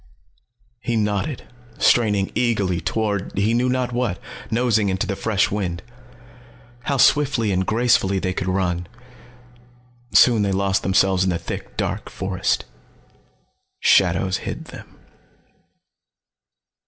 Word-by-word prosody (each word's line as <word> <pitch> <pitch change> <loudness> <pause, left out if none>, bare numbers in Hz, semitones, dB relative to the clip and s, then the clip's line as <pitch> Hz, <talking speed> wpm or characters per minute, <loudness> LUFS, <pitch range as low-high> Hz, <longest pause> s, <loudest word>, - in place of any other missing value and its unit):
He 120 0 -2
nodded, 105 +6 -1 0.3
straining 105 -5 +2
eagerly 100 -8 0
toward 105 -4 -2
he 105 +3 +2
knew 125 +2 +1
not 125 -1 -1
what, 120 -7 -1 0.3
nosing 110 -3 +1
into 95 +2 -1
the 100 -1 -3
fresh 105 -1 0
wind. 90 -4 -3 1.0
How 140 - 0
swiftly 135 -6 +3
and 95 0 0
gracefully 110 -4 +2
they 95 0 -1
could 95 - -3
run. 90 -2 -1 1.2
Soon 120 -4 +5
they 100 -1 0
lost 95 0 +1
themselves 95 0 +2
in 95 - +1
the 85 - 0
thick - - -7
dark - - -3
forest. - - -2 1.1
Shadows 95 0 +3
hid - - -6
them. - - -13
100 Hz, 115 wpm, -21 LUFS, 95-120 Hz, 1.2 s, Soon